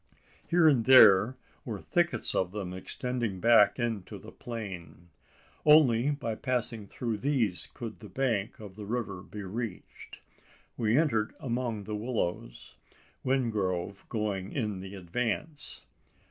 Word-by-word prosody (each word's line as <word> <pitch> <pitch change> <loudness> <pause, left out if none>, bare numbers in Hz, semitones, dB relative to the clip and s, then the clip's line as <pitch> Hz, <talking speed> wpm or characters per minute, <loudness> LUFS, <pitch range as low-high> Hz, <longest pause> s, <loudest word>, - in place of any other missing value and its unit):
Here 170 -1 +5
and 130 -7 +4
there 130 -2 +7 0.3
were 110 -5 -5
thickets 170 - 0
of 95 0 0
them 95 -4 -4
extending 115 +1 -3
back 115 0 +5
into 115 -6 -3
the - - -12
plain. 90 -8 -8 0.5
Only 145 -5 +6
by 140 -6 -2
passing 115 -3 -2
through 115 0 -3
these 120 -9 0
could 115 -3 -7
the 105 - -11
bank 115 -7 -1
of 105 -3 -10
the 105 -1 -8
river 105 -5 -3
be 105 +2 -8
reached. 105 +1 -7 0.5
We 115 +1 +2
entered 115 -9 +1
among 120 -6 -2
the 105 +1 -4
willows, 105 - -4 0.5
Wingrove 100 -8 -1
going 105 -4 -2
in 105 -7 -2
the 95 +1 -8
advance. 125 - -3
110 Hz, 130 wpm, -29 LUFS, 100-125 Hz, 0.5 s, there